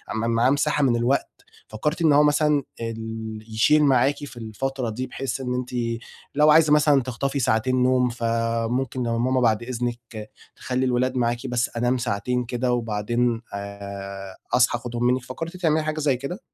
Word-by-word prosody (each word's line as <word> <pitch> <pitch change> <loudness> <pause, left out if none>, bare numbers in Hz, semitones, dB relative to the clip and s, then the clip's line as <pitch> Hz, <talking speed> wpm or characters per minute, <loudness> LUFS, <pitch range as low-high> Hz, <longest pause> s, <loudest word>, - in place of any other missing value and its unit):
م 115 +1 -1
معاه 115 +2 +3
مساحة 145 +1 +1
من 125 -3 +3
الوقت، 120 +4 +1 0.4
فكرتِ 150 +10 -2
إن 160 -3 +5
هو 145 +1 +6
مثلًا 150 -1 +3 0.2
ال 110 -1 -5
يشيل 130 +8 +4
معاكِ 135 0 +4
في 120 -3 -12
الفترة 120 +3 -3
دي 125 +4 -4
بحيث 135 0 -4
إن 125 -1 -2
أنتِ 125 0 -3 0.7
لو 150 +1 +5
عايزة 155 -1 +6
مثلًا 150 -2 +4
تخطفي 135 +3 -2
ساعتين 125 +2 +1
نوم 125 0 +3
فممكن 115 +2 -1
ماما 120 +2 +1
بعد 115 -2 +2
إذنك 120 -3 -5 0.2
تخلي 130 0 -2
الولاد 130 +1 +1
معاكِ 120 +1 -1
بس 120 +1 0
أنام 120 +2 +1
ساعتين 120 +2 -1
كده 125 +1 -1
وبعدين 115 +1 0
آآ، 100 -1 -7 0.2
أصحى 125 -1 +4
آخدهم 120 0 -4
منكِ، 125 0 +1
فكرتِ 165 +8 -6
تعملي 160 -3 +1
حاجة 155 0 -2
زي 140 -4 +1
كده؟ 140 - -5
125 Hz, 165 wpm, -24 LUFS, 115-135 Hz, 0.7 s, هو